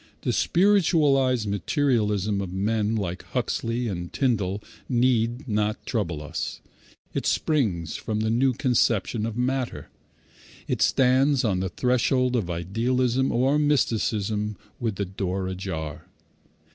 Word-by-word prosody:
The - - 0
spiritualized 150 - +3
materialism 105 - 0
of 95 -2 -5
men 105 +3 0
like 90 -4 -3
Huxley 115 +1 -2
and 85 -4 -4
Tyndall 105 -6 0 0.3
need 120 0 +1
not 105 -1 -1
trouble 85 - -2
us. 75 - -4 0.5
It - - -1
springs 100 - 0
from 110 -1 -3
the 110 0 0
new 130 +3 +3
conception 115 -3 +1
of 115 0 -5
matter. 130 0 -2 0.8
It - - -1
stands 135 +1 +3
on 95 -4 +1
the 95 0 -1
threshold 125 +2 +1
of 105 -7 -1
idealism 120 +9 0
or 135 +5 +2
mysticism 110 -7 0 0.2
with 115 -5 -1
the 100 - -2
door 95 0 -3
ajar. 90 -5 -5
115 Hz, 120 wpm, -25 LUFS, 100-130 Hz, 0.8 s, spiritualized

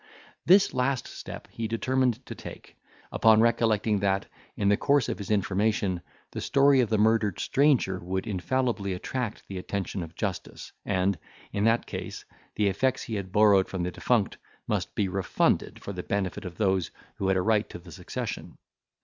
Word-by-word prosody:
This 195 +2 +6
last 130 0 0
step - - -9
he 115 -1 -3
determined 125 +2 0
to - - -6
take, - - -11 0.4
upon 110 -1 +5
recollecting, 110 -2 +2
that, 95 0 +1 0.3
in 100 - +1
the 105 - +5
course 140 +2 +2
of - - -3
his 100 - -6
information, 100 -2 +1 0.3
the - - -5
story 140 -1 +4
of 120 - 0
the 110 - +2
murdered 110 -2 +2
stranger 135 -10 +2
would 95 +2 -3
infallibly 105 0 -1
attract 115 +4 -4
the 95 -1 -5
attention 95 0 -3
of 80 0 -8
justice, 100 -5 -5
and, 95 -1 +1 0.3
in 100 +1 +1
that 115 +1 +3
case, - - -6 0.3
the 105 - +1
effects 100 +7 +1
he 125 -6 -6
had 100 -3 -4
borrowed 100 -2 +5
from 95 -2 -3
the 90 - -2
defunct - - 0 0.3
must - - -2
be 100 - +1
refunded 95 0 0
for 100 - -5
the 90 - -4
benefit 100 +1 -2
of 90 -1 -7
those 95 -4 +1 0.3
who 95 - -1
had 95 0 +3
a - - +2
right 110 0 +2
to - - -7
the 85 0 -14
succession. - - -6
105 Hz, 175 wpm, -27 LUFS, 95-115 Hz, 0.4 s, This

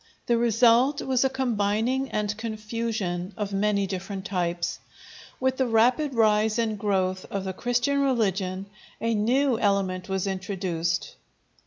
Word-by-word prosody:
The 235 - +2
result 240 +4 +4
was 260 -1 +2
a 265 - +3
combining 245 +1 0
and 210 -1 -1
confusion 215 -4 -3
of 205 -2 -3
many 200 0 +1
different 190 +1 -5
types. 175 -3 -2 0.6
With 260 0 0
the 260 - +1
rapid 250 +5 +2
rise 215 -1 +3
and 220 -3 -1
growth 190 -2 0
of 195 -1 -3
the 190 -1 -4
Christian 245 +7 0
religion, 195 -8 0 0.3
a 230 0 0
new 240 +3 +2
element 195 -3 0
was 190 0 -1
introduced. 185 -4 -2
210 Hz, 135 wpm, -26 LUFS, 190-240 Hz, 0.6 s, result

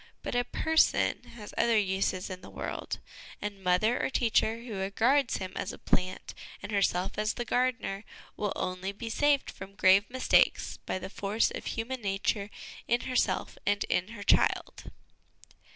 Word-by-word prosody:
But - - -3
a 245 0 +2
person 320 +6 +2
has 210 -3 -9
other 230 -1 +4
uses 190 -2 0
in 185 0 -6
the - - -11
world, - - -4 0.4
and 200 -2 -5
mother 185 +6 +2
or - - +1
teacher 230 -2 +1
who 235 -3 -7
regards 230 +8 +2
him 185 -1 -5
as - - -3
a - - -9
plant 185 +1 -1 0.3
and - - -5
herself 195 -1 +1
as 215 0 0
the 240 - -3
gardener, 245 -5 0 0.3
will 205 - -1
only 185 +2 -3
be 225 +2 -6
saved 290 +2 +2
from 195 +1 -10
grave 195 +1 +5
mistakes 255 +1 +2
by - - -1
the 190 - -7
force 205 +3 +1
of - - -6
human 240 +3 -3
nature 200 0 -1 0.4
in 240 +1 +2
herself 255 -1 0
and 205 0 +1
in 180 - +1
her 205 - -6
child. - - +2
205 Hz, 165 wpm, -30 LUFS, 195-240 Hz, 0.4 s, grave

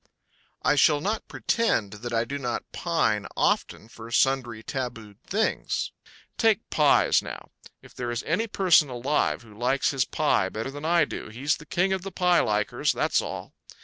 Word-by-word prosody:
I - - +4
shall 145 +1 +4
not 210 +8 -2
pretend 115 - 0
that 120 0 -5
I 115 0 +1
do 140 +3 -4
not 120 -3 -4
pine - - 0
often 110 - 0
for 115 0 -11
sundry 120 -2 +1
tabooed 115 -6 -6
things. 215 +3 -1 0.5
Take 225 -1 +2
pies, 150 -2 +4
now - - -9 0.3
if - - -16
there 120 -1 -4
is 120 0 -3
any 205 +9 0
person 180 -8 +4
alive 130 +2 0
who 110 -2 -16
likes 125 +5 +1
his 135 -2 +1
pie 105 -11 +1
better 110 +6 -5
than 145 +2 -7
I 170 -1 +4
do - - -7
he's 130 +7 -1
the 150 - -14
king 190 +2 +1
of 190 - -2
the 195 +1 -7
pie 180 -1 +3
likers, 105 0 +1
that's - - +1
all. - - -7
135 Hz, 175 wpm, -26 LUFS, 115-170 Hz, 0.5 s, I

